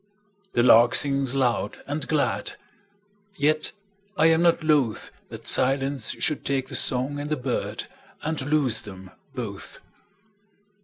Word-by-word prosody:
The 120 Hz, -, +3 dB
lark 120 Hz, -1 st, +6 dB
sings 140 Hz, -2 st, 0 dB
loud 125 Hz, -3 st, -1 dB
and 145 Hz, +2 st, -3 dB
glad, 155 Hz, -2 st, -1 dB, 0.8 s
Yet 155 Hz, +1 st, +1 dB, 0.5 s
I 155 Hz, -, +4 dB
am 160 Hz, +1 st, +3 dB
not 170 Hz, -1 st, +3 dB
lothThat 145 Hz, -8 st, -1 dB
silence 135 Hz, -1 st, +1 dB
should 150 Hz, -, -1 dB
take 135 Hz, -1 st, -1 dB
the 135 Hz, -, -6 dB
song 130 Hz, +3 st, +1 dB
and 145 Hz, +1 st, -5 dB
the 155 Hz, -, 0 dB
birdAnd 140 Hz, +4 st, -5 dB
lose 140 Hz, -7 st, +1 dB
them 95 Hz, -2 st, -11 dB, 0.2 s
both. -, -, -7 dB
140 Hz, 120 wpm, -25 LUFS, 125-150 Hz, 0.8 s, lark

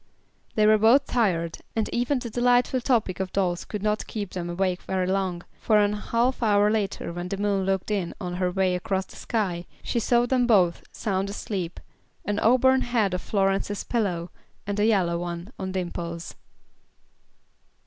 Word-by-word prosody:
They 215 Hz, -, +4 dB
were 215 Hz, 0 st, +5 dB
both 240 Hz, +6 st, +5 dB
tired, 175 Hz, -9 st, 0 dB, 0.2 s
and 220 Hz, -2 st, 0 dB
even 245 Hz, +4 st, 0 dB
the 240 Hz, -2 st, -5 dB
delightful 245 Hz, +2 st, +2 dB
topic 225 Hz, -8 st, +1 dB
of 190 Hz, -1 st, -2 dB
dolls 180 Hz, -3 st, 0 dB
could 210 Hz, -2 st, -5 dB
not 210 Hz, 0 st, 0 dB
keep 205 Hz, -4 st, -5 dB
them 175 Hz, -2 st, -4 dB
awake 180 Hz, +1 st, -1 dB
very 185 Hz, -1 st, -1 dB
long, 185 Hz, -2 st, -1 dB, 0.2 s
for 215 Hz, -, +3 dB
a 205 Hz, 0 st, +3 dB
half 235 Hz, +5 st, 0 dB
hour 210 Hz, -2 st, +4 dB
later 205 Hz, -5 st, -2 dB
when 175 Hz, +1 st, -4 dB
the 195 Hz, -, -3 dB
moon 200 Hz, -1 st, 0 dB
looked 195 Hz, +1 st, -1 dB
in 195 Hz, -5 st, -1 dB
on 180 Hz, -3 st, -4 dB
her 180 Hz, -1 st, +1 dB
way 185 Hz, 0 st, +1 dB
across 190 Hz, +1 st, -1 dB
the -, -, -15 dB
sky, 180 Hz, -6 st, -2 dB, 0.2 s
she 235 Hz, -, -1 dB
saw 240 Hz, +1 st, +3 dB
them 245 Hz, -1 st, +2 dB
both 185 Hz, -7 st, +4 dB
sound 195 Hz, -2 st, -2 dB
asleep, 190 Hz, -4 st, -4 dB, 0.5 s
an 205 Hz, 0 st, -1 dB
auburn 260 Hz, +2 st, +4 dB
head 225 Hz, -7 st, +1 dB
on 180 Hz, -, -1 dB
Florence's 195 Hz, +1 st, 0 dB
pillow, 180 Hz, -7 st, -1 dB, 0.3 s
and 205 Hz, 0 st, -2 dB
a 210 Hz, -, +4 dB
yellow 180 Hz, -6 st, +2 dB
one 175 Hz, +3 st, -5 dB
on 190 Hz, -1 st, -3 dB
Dimple's. 170 Hz, -2 st, -4 dB
200 Hz, 175 wpm, -25 LUFS, 180-225 Hz, 0.5 s, were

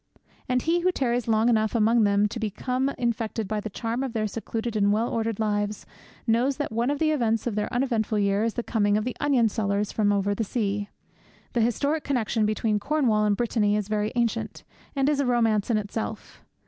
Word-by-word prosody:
And 250 Hz, -1 st, +1 dB
he 335 Hz, +2 st, +2 dB
who 365 Hz, +1 st, +2 dB
tarries 245 Hz, -6 st, -1 dB
long 220 Hz, 0 st, +3 dB
enough 220 Hz, -1 st, +2 dB
among 225 Hz, 0 st, +4 dB
them 205 Hz, +1 st, +3 dB
to 230 Hz, -, -5 dB
become 250 Hz, +5 st, -1 dB
infected 225 Hz, -2 st, -2 dB
by 215 Hz, +1 st, -1 dB
the 215 Hz, -, -5 dB
charm 230 Hz, +4 st, -3 dB
of 265 Hz, -3 st, -3 dB
their 220 Hz, -2 st, 0 dB
secluded 225 Hz, +2 st, -4 dB
and 205 Hz, -1 st, +3 dB
well 220 Hz, +3 st, +1 dB
ordered 225 Hz, -2 st, -2 dB
lives 205 Hz, -1 st, -1 dB, 0.4 s
knows 245 Hz, +4 st, +2 dB
that 290 Hz, -, -3 dB
one 230 Hz, +3 st, 0 dB
of 290 Hz, -, 0 dB
the 310 Hz, +1 st, +2 dB
events 230 Hz, -7 st, 0 dB
of 240 Hz, -, -1 dB
their 210 Hz, 0 st, -2 dB
uneventful 235 Hz, -4 st, 0 dB
year 200 Hz, 0 st, +2 dB
is 230 Hz, -1 st, -1 dB
the 240 Hz, -, -2 dB
coming 205 Hz, -3 st, +1 dB
of 215 Hz, -, -1 dB
the 250 Hz, +1 st, -3 dB
onion 270 Hz, -6 st, +3 dB
sellers 205 Hz, -2 st, -1 dB
from 205 Hz, -2 st, +2 dB
over 200 Hz, 0 st, +1 dB
the 225 Hz, -, -1 dB
sea. 205 Hz, -2 st, -2 dB, 0.6 s
The 235 Hz, -, +2 dB
historic 280 Hz, +7 st, 0 dB
connexion 230 Hz, -5 st, 0 dB
between 215 Hz, 0 st, 0 dB
Cornwall 240 Hz, -6 st, +1 dB
and 205 Hz, -1 st, +2 dB
Brittany 215 Hz, -3 st, +1 dB
is 210 Hz, -1 st, -2 dB
very 210 Hz, 0 st, 0 dB
ancient, 235 Hz, -2 st, -1 dB, 0.3 s
and 275 Hz, 0 st, +1 dB
is 295 Hz, -1 st, +2 dB
a 280 Hz, -, +2 dB
romance 225 Hz, -4 st, +2 dB
in 230 Hz, -, +3 dB
itself. 215 Hz, +1 st, -5 dB
225 Hz, 210 wpm, -26 LUFS, 210-245 Hz, 0.6 s, among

